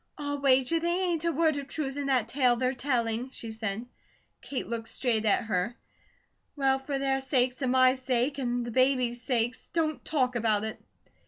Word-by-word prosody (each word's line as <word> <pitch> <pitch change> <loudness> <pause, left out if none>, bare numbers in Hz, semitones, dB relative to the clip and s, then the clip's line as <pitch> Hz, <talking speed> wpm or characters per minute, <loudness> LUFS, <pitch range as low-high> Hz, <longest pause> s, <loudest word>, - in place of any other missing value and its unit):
"I'll 285 -1 -3
wager 270 +3 +3
they 345 +2 0
ain't 335 -1 -2
a 335 - +2
word 315 -1 +2
of 280 -1 -5
truth 275 -3 -3
in 285 -1 -3
that 255 -5 +2
tale 250 -1 +3
they're 255 +2 0
telling," 245 -2 -1
she 230 -3 -7
said. 220 0 -4 0.6
Kate 275 - -4
looked 230 -1 -4
straight 225 -4 0
at 215 +3 +3
her: 215 +2 -1 0.8
"Well, 270 -2 +2
for 275 +1 -3
their 270 0 0
sakes 260 -1 0
and 255 -2 +1
my 255 0 +5
sake, 260 +1 -1
and 245 -2 -1
the 240 - -5
babies' 255 -1 +2
sake, 240 -1 0 0.2
don't 315 -2 0
TALK 255 -5 0
about 215 -3 +1
it." 220 +1 -5
255 Hz, 185 wpm, -28 LUFS, 235-275 Hz, 0.8 s, my